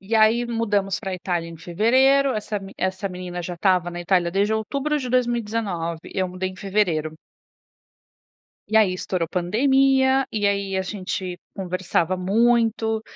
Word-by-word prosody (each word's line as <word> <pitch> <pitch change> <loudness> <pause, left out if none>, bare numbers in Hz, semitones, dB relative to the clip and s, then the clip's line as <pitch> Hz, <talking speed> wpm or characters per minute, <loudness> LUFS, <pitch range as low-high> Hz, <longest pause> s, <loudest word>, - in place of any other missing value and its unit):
E 195 +3 -17
aí 225 +2 +4 0.2
mudamos 205 -3 0
pra 190 -1 -3
Itália 175 -3 -2
em 165 - -10
fevereiro, 260 +9 +4
essa 210 0 -4
mi 195 0 -10
essa 190 +1 -1
menina 180 -1 -6
já 175 +1 -5
estava 180 -1 +1
na 175 - -6
Itália 175 -1 +1
desde 200 +4 +1
outubro 280 +7 -1
de 255 -3 -4
2019, 215 -9 -1
eu 185 -1 0
mudei 185 +1 -4
em 185 - -13
fevereiro. 180 -7 0 1.5
E 220 - +3
aí 200 -4 +4
estourou 180 -2 -2
pandemia, 265 - +3
e 210 -2 -1
aí 200 -1 -1
a - - +1
gente 185 -2 -4 0.2
conversava 185 -1 -1
muito, 225 +3 +2
195 Hz, 150 wpm, -23 LUFS, 180-225 Hz, 1.5 s, aí